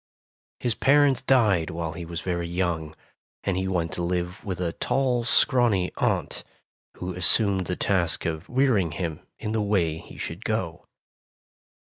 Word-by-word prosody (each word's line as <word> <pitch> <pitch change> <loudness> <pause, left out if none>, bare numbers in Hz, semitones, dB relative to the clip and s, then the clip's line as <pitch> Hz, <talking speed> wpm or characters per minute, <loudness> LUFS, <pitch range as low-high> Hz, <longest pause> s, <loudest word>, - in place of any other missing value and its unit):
His 120 - 0
parents 140 +1 +4
died 110 - +3
while 80 0 -3
he 85 +1 -6
was 85 +1 -5
very 85 -2 -2
young, 85 -3 -2 0.5
and 100 - 0
he 95 +1 -1
went 85 -4 -1
to - - -4
live 90 0 -2
with 95 -4 -4
a 85 -2 -1
tall 125 -3 0
scrawny 115 -8 +3
aunt, - - 0 0.5
who 90 0 -4
assumed 95 +1 +2
the 90 - -1
task 90 -4 0
of 80 -2 -3
rearing 120 - +2
him 80 -2 -3 0.2
in 105 - -4
the 110 0 0
way 90 -6 +1
he - - -13
should - - -6
go. - - -3
90 Hz, 155 wpm, -26 LUFS, 85-110 Hz, 0.5 s, parents